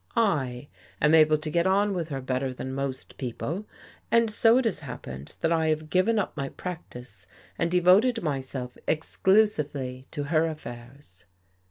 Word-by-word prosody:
I 145 - +1 0.3
am 150 +1 +4
able 155 -1 +6
to 155 0 -5
get 170 +3 +2
on 200 +2 +2
with 170 -3 -3
her 135 -2 -4
better 130 +1 -1
than 130 +1 -5
most 135 -1 -5
people, 155 - -4 0.4
and 230 -1 +3
so 225 +3 +5
it 260 - +1
has 215 -8 0
happened 70 - -8
that 165 - +1
I 160 -1 +2
have 155 0 -1
given 210 +5 +3
up 205 - -1
my 135 -3 -3
practice 125 - -8 0.3
and 170 - +1
devoted 185 +7 +4
myself 130 -4 -4
exclusively 150 -7 +1
to 145 - -4
her 155 +2 +2
affairs." 120 - -10
155 Hz, 160 wpm, -27 LUFS, 130-185 Hz, 0.4 s, able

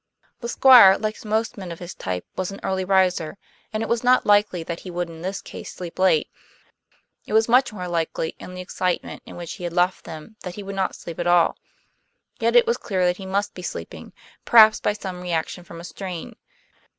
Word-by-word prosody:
The 235 - -5
Squire, 240 -8 +8
like 215 +1 -4
most 220 0 -1
men 185 -3 -7
of 170 - -7
his 175 +1 -8
type, 90 -1 -4
was 185 -1 -2
an 195 - -8
early 190 -1 -1
riser, 185 -3 +1 0.3
and 215 0 -2
it - - -1
was 235 0 0
not 250 +1 +4
likely 205 -4 +3
that 170 +1 -5
he 185 - -9
would 175 -1 -3
in 165 0 -11
this 190 +3 -4
case - - -9
sleep 175 -1 -8
late; 185 -5 +3 1.0
it - - -5
was 220 +1 +4
much 250 +1 +4
more 180 -4 -6
likely, 165 -1 -2
in 180 - -9
the 180 - -6
excitement 180 0 -3
in - - -10
which 170 -1 -6
he - - -10
had 175 -1 -3
left 180 +1 +1
them, 165 +7 -10
that 180 -1 -7
he 205 - -7
would 200 0 -6
not 190 -1 -1
sleep 170 0 -9
at 175 - -1
all. 175 -1 +4 0.8
Yet - - +1
it 485 0 +7
was 470 +1 +1
clear 185 -4 -1
that 180 0 +1
he 190 - -8
must 200 +2 -1
be 180 - -9
sleeping, 85 - -7 0.3
perhaps 220 -2 +7
by - - 0
some 190 -3 -7
reaction 175 0 -3
from 170 -1 -11
a - - -9
strain. 180 -1 -7
185 Hz, 220 wpm, -23 LUFS, 175-210 Hz, 1.0 s, Squire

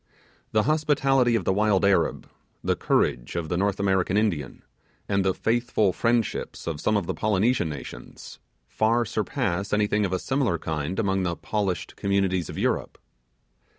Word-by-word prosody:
The 110 -1 +3
hospitality 135 -4 +2
of 100 -6 -1
the - - +2
wild 105 -1 +2
Arab, 100 -1 +1 0.4
the - - +1
courage - - 0
of 85 -2 -3
the 85 - 0
North 100 +2 0
American 95 -1 +1
Indian, 85 - -1 0.4
and 100 -1 +1
the 95 -1 +1
faithful 115 -4 +1
friendship 115 -2 0
of 80 -3 -4
some 105 - +2
of 100 - -2
the - - -2
Polynesian 110 -2 +1
nations, 70 -5 -9 0.3
far 115 - +1
surpass 95 -1 -2
anything 105 0 +2
of 95 - -1
a 95 - +1
similar 130 -4 0
kind 80 +2 -3
among 95 -3 +1
the 85 -2 -1
polished 100 -3 -3
communities 95 -3 0
of - - -7
Europe. - - -1
100 Hz, 155 wpm, -25 LUFS, 90-110 Hz, 0.4 s, The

